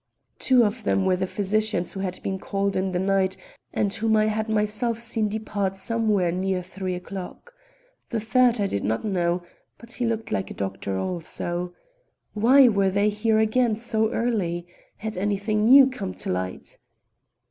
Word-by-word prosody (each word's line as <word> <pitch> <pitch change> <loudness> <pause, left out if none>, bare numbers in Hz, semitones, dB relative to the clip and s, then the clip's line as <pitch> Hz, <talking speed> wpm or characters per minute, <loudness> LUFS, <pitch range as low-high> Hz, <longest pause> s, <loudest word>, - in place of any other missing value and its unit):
Two 255 -2 +4
of 215 +2 -3
them 195 -1 +1
were 185 -1 +3
the 185 +1 -2
physicians 205 -1 -1
who 195 - -6
had 185 -1 -3
been 190 -1 -2
called 195 0 -2
in 190 0 0
the 180 - -1
night 190 0 +1 0.3
and 200 -1 0
whom 220 +1 +1
I 215 - +3
had 215 +1 -2
myself 215 +2 0
seen 225 -2 -1
depart 205 -2 -2
somewhere 210 -3 0
near 185 +1 -1
three 185 0 -4
o'clock. 190 - -8 0.6
The 235 - -1
third 240 +2 +3
I 200 - +2
did 100 - -2
not 110 - -1
know, 175 -3 0 0.3
but 235 0 -13
he 245 -1 -2
looked 225 -1 -3
like 205 -3 -1
a - - -8
doctor 95 0 -3
also. 175 - -3 0.6
Why 250 +5 +6
were 200 -4 +3
they 200 +2 +2
here 215 +1 +1
again 220 +1 +2
so 220 -1 0
early? 185 -8 -1 0.3
Had 220 -2 -5
anything 205 +2 0
new 270 +3 +9
come 210 -8 -5
to - - -3
light? 90 0 -4
205 Hz, 170 wpm, -24 LUFS, 185-220 Hz, 0.6 s, new